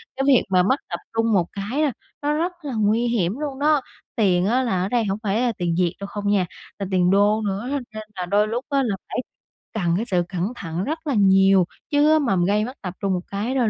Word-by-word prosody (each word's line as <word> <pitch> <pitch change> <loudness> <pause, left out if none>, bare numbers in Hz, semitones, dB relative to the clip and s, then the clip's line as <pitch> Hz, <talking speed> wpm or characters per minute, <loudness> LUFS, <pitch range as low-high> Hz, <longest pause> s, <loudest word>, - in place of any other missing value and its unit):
cái 270 - -1
việc 270 -4 +5
mà 180 -1 +4
mất 260 +9 +2
tập - - -3
trung 225 -1 +1
một 180 -4 +3
cái, 210 +9 -3
a, 295 -4 +2 0.3
nó 295 +1 +1
rất 340 +4 0
là 280 -4 -5
nguy 220 +3 +2
hiểm 215 -2 0
luôn 280 -3 -4
đó. 300 -1 +3 0.3
Tiền 185 -4 +3
á 250 +5 +2
là 190 -7 0
ở 190 - -2
đây 235 -3 +1
hổng 195 +1 -2
phải 210 +3 +1
là 245 -2 +2
tiền 170 -2 -1
Việt 180 -1 +1
đâu 200 - -5
không 205 0 -5
nha, 200 -3 +3 0.3
là 200 - -2
tiền 180 -1 +3
đô 205 +2 +3
nữa 205 +6 -2
á, 285 - 0
nên 215 0 -6
là 180 -1 -3
đôi 205 +3 +2
lúc 235 +4 -3
á 275 -1 +2
là 210 -5 0
phải - - -4 0.6
cần 175 -6 0
cái 225 - -1
sự 180 -4 +1
cẩn 190 +5 -2
thận 170 -1 -4
rất 315 +4 -4
là 280 - +1
nhiều. 195 -2 +5 0.3
Chứ 295 +1 +4
á, 315 - +5
mà 240 -9 +1
m 175 -1 +2
gây 210 +2 +2
mất 255 - -6
tập 180 -2 -5
trung 195 -1 +1
một 180 - 0
cái 220 +7 -2
đôi 240 -4 +2
210 Hz, 265 wpm, -23 LUFS, 190-255 Hz, 0.6 s, việc